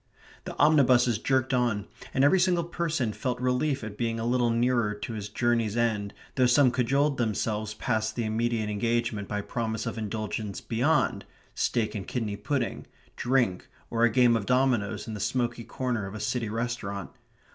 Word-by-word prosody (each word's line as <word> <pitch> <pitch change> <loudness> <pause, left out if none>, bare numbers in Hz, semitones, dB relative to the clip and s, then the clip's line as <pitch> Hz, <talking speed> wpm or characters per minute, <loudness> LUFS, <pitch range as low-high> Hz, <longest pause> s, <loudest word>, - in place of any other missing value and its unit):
The - - -6
omnibuses 130 -6 +4
jerked 130 +1 +1
on, 120 -5 +1 0.3
and 135 - +2
every 165 +7 +5
single 175 -1 +2
person 165 -9 -1
felt 125 +1 -3
relief 125 +2 0
at 105 -1 -7
being 115 -1 -1
a 115 - -2
little 120 0 +2
nearer 115 -2 +1
to 115 +3 -6
his 105 -2 -5
journey's 115 -1 0
end, 110 -4 0 0.2
though 130 -2 +3
some 125 +1 +5
cajoled 135 +3 +1
themselves 110 -1 -1
past 110 0 -1
the 120 - -1
immediate 110 0 0
engagement 115 0 -1
by 105 -1 -2
promise 110 0 -3
of - - -4
indulgence 110 -1 -4
beyond 125 +7 +1 0.3
steak 110 -3 0
and 105 -4 -5
kidney 110 -5 -2
pudding, 135 +6 -2 0.3
drink 120 -7 +1 0.2
or 115 0 +1
a 120 - +6
game 120 0 +4
of 105 -3 -2
dominoes 120 -6 +1
in 110 - -5
the 105 - -5
smoky 120 +2 -1
corner 120 -5 -2
of 95 - -8
a - - -5
city 115 0 -1
restaurant. 110 -4 -3
120 Hz, 170 wpm, -27 LUFS, 110-125 Hz, 0.3 s, a